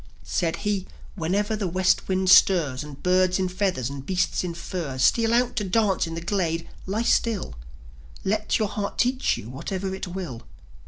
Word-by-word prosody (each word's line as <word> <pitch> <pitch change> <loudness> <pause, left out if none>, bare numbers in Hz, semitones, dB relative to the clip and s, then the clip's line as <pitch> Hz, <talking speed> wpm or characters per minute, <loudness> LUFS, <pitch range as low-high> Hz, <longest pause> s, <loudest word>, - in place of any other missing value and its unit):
Said 165 - -1
he: 200 -2 0 0.3
"Whenever 200 +5 0
the 205 -3 -2
West 185 +1 +2
wind 190 0 0
stirs, 165 -8 +5
And 145 -2 -11
birds 185 0 +3
in 190 -1 0
feathers 180 - -1
and 140 0 -6
beasts 185 +3 0
in 175 -2 -4
furs 155 -7 -3
Steal 230 -1 +4
out 245 +1 +2
to 210 - +1
dance 200 -2 +1
in 165 - -5
the 165 - -4
glade, 170 -2 -1 0.2
lie 210 +4 -1
still: 230 - +1 0.7
Let 215 +2 +1
your 215 - +1
heart 200 0 -4
teach 255 +2 +1
you 105 - -8
what 135 +8 -7
it 190 0 -3
will." 175 -10 -6
185 Hz, 175 wpm, -25 LUFS, 165-205 Hz, 0.7 s, stirs